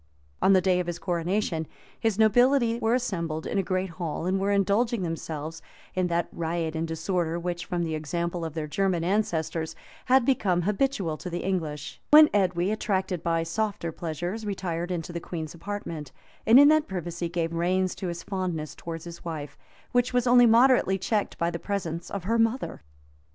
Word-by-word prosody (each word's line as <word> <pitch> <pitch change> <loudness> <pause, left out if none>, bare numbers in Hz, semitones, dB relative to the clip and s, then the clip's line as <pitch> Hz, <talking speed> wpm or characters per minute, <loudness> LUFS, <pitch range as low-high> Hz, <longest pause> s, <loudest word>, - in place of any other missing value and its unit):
On 195 - +5
the 185 - +5
day 180 -1 +2
of 180 - -2
his 175 -1 -3
coronation, 175 -2 -1 0.3
his 225 -4 0
nobility 235 +2 +4
were 230 0 +2
assembled 170 -10 -2
in 200 - -1
a - - +4
great 185 0 -2
hall, 165 -1 -4
and 190 +1 +1
were 195 +1 0
indulging 200 +2 +2
themselves 165 -1 -5 0.3
in 185 -1 +1
that 170 -1 0
riot 165 -1 -2
and 160 +1 -1
disorder, 165 +1 -1
which, 175 0 -4
from 175 -2 -1
the 160 -1 -2
example 170 +3 -2
of 160 -1 -5
their 160 -2 -2
German 180 +2 0
ancestors, 170 -5 -1 0.3
had 260 -1 +4
become 190 -10 +2
habitual 200 - 0
to 180 - -6
the 175 0 -4
English;[*] 155 -6 -3
when 305 0 +8
Edwy, 185 -2 +2
attracted 190 -5 -1
by 165 -1 0
softer 195 0 -2
pleasures, 175 +7 -4
retired 180 -4 -3
into 175 -1 -4
the 170 - -3
queen's 160 -2 -6
apartment, 170 -6 -6 0.4
and 230 +4 +9
in 285 +1 +8
that 310 0 +3
privacy 175 -2 -4
gave 170 -1 -2
reins 185 +2 +1
to 190 - -5
his 170 -1 -5
fondness 180 -6 -3
towards 165 -1 -7
his 170 0 -9
wife, 155 -4 -5 0.4
which 245 0 +2
was 245 -1 +2
only 245 0 +7
moderately 230 -4 +5
checked 205 +2 -1
by 170 0 0
the 170 - -4
presence 170 -5 -3
of 200 -3 -4
her 230 +5 +1
mother. 225 +4 0
180 Hz, 180 wpm, -27 LUFS, 165-205 Hz, 0.4 s, and